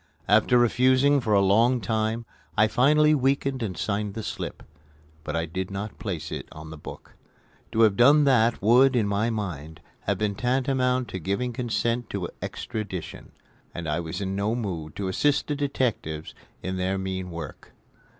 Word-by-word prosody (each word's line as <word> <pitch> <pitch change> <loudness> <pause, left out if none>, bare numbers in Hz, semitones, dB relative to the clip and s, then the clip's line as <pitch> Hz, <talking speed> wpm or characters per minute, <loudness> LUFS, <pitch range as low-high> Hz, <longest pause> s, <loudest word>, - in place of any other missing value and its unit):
After 110 +4 +4
refusing 130 +4 +4
for 110 -4 0
a 100 - +5
long 115 +6 +4
time 110 +2 -1 0.3
I 110 - +6
finally 150 +7 +4
weakened 135 -1 +1
and 95 -7 -3
signed 105 -1 -2
the 110 - -4
slip; - - -5 0.6
but 75 - -4
I 80 0 0
did 95 +3 -4
not 100 +2 -6
place 85 -8 -4
it - - -6
on 80 +1 -10
the 80 - -8
book. - - -10 0.6
To 115 0 +1
have 110 -3 +5
done 140 +7 +6
that 120 -6 +3
would, 125 +5 +5
in 110 -4 +2
my 100 +3 0
mind, 80 -8 -5 0.3
have - - +1
been 105 -1 0
tantamount 125 +2 0
to 95 - -5
giving 100 +8 -2
consent 120 0 -1
to 90 -4 -3
extradition; 100 -5 -6 0.4
and 85 -2 -5
I 75 +3 0
was 80 +3 -5
in 95 0 -2
no 105 +3 0
mood 85 -10 -4
to 100 - -3
assist 140 +9 +1
the 145 - -2
detectives 120 - -2 0.3
in 95 0 -3
their 95 +1 0
mean 95 -1 -4
work. 85 -4 -8
110 Hz, 170 wpm, -26 LUFS, 95-125 Hz, 0.6 s, I